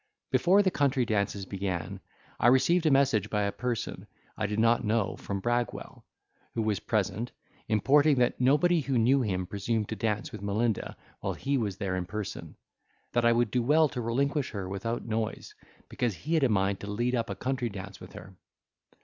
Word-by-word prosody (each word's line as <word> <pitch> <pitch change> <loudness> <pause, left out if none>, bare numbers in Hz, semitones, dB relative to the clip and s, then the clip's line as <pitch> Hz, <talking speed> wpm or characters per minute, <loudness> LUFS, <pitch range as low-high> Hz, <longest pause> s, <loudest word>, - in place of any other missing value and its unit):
Before 195 +4 +4
the 185 - +2
country 140 -5 +1
dances 100 -2 -1
began, 95 -3 -4 0.4
I - - +4
received 160 +7 +4
a - - +6
message 135 -7 +3
by 105 -1 0
a 100 - 0
person 120 +1 -4 0.3
I 110 - -1
did 105 +1 -3
not 115 +2 +3
know 110 -1 0
from 100 -1 -4
Bragwell, 120 +2 -2 0.5
who 115 - 0
was 105 -3 0
present, 105 +2 -1 0.4
importing 140 +7 +4
that 125 0 +1
nobody 155 +6 +4
who 135 -2 -1
knew 130 +4 +4
him 95 -6 -1
presumed 105 +3 -2
to 110 - -3
dance 110 -1 -2
with 110 -4 -8
Melinda 105 +2 -1 0.2
while - - -2
he 140 +1 -1
was 105 -7 -1
there 95 -2 -2
in 90 -1 -3
person, 105 +2 -6 0.6
that 120 -1 +2
I 115 - +6
would 120 -2 +1
do 125 - +1
well 150 +6 +4
to 125 -3 -4
relinquish 135 +4 0
her 100 -3 -5
without 100 +5 -3
noise, 110 -1 -3 0.3
because 120 -5 -2
he 155 - -4
had 160 -3 +3
a 135 - +4
mind 95 -2 +1
to 100 - -7
lead 120 +4 -1
up 115 -3 -1
a 100 - -3
country 125 0 -2
dance 100 -1 -8
with - - -12
her. 95 - -11
115 Hz, 190 wpm, -29 LUFS, 100-130 Hz, 0.6 s, a